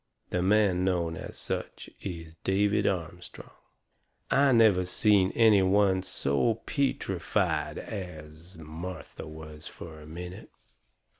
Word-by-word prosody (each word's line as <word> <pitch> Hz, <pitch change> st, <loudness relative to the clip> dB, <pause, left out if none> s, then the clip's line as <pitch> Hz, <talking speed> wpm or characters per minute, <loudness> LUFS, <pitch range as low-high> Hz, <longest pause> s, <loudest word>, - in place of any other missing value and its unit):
The 90 Hz, -, 0 dB
man 95 Hz, -1 st, +3 dB
known 85 Hz, -3 st, 0 dB
as -, -, -7 dB
such -, -, -5 dB
is 80 Hz, -4 st, -7 dB
David 100 Hz, +2 st, +2 dB
Armstrong!" 90 Hz, -1 st, -4 dB, 0.8 s
I 140 Hz, 0 st, +5 dB
never 110 Hz, -6 st, +5 dB
seen 95 Hz, +1 st, +3 dB
any 110 Hz, -4 st, +6 dB
one 95 Hz, 0 st, +3 dB
so 95 Hz, -, 0 dB
peetrified 140 Hz, -2 st, 0 dB
as 85 Hz, -3 st, -8 dB
Martha 80 Hz, +1 st, -8 dB
was 75 Hz, 0 st, -9 dB
fur 80 Hz, -2 st, -10 dB
a 75 Hz, -, -12 dB
minute. 90 Hz, +3 st, -8 dB
90 Hz, 115 wpm, -28 LUFS, 80-100 Hz, 0.8 s, any